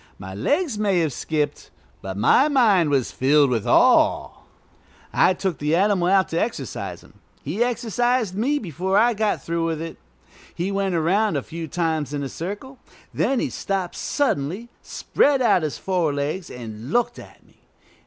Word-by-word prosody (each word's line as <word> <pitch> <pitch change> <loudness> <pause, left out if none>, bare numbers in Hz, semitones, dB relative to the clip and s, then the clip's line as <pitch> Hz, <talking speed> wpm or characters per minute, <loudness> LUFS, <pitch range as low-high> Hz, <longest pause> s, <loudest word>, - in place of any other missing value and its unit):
My 95 -1 -8
legs 275 - 0
may 195 -4 +2
have 155 -5 -1
skipped, 150 0 -3 0.3
but 95 0 -6
my 120 - +4
mind 215 - +3
was 135 -4 0
filled 140 +1 +3
with 115 -4 -1
awe. - - +4 0.8
I 185 - +4
took 185 -4 -3
the 150 +2 +1
animal 190 -1 +2
out 190 0 +3
to 165 - -1
exercise 235 - -4
him. - - -21 0.2
He 225 - 0
exercised 240 -2 0
me 265 +8 +1
before 190 - -2
I 235 +3 +4
got 215 -1 -1
through 170 0 -2
with 165 -2 -1
it. 165 0 -6 0.6
He 180 +4 -2
went 195 -2 -1
around 180 +3 +1
a 135 - -3
few 165 0 -7
times 155 -3 -2
in 140 - -3
a 135 - -4
circle; 205 - -7 0.3
then 270 -2 +1
he - - -2
stopped 190 -3 -3
suddenly, 210 - -1
spread 280 -1 +1
out 235 -7 +3
his 150 -6 -3
forelegs, 160 -2 -2
and 115 +1 -8
looked 240 0 0
at - - -15
me. - - -27
180 Hz, 165 wpm, -23 LUFS, 150-215 Hz, 0.8 s, my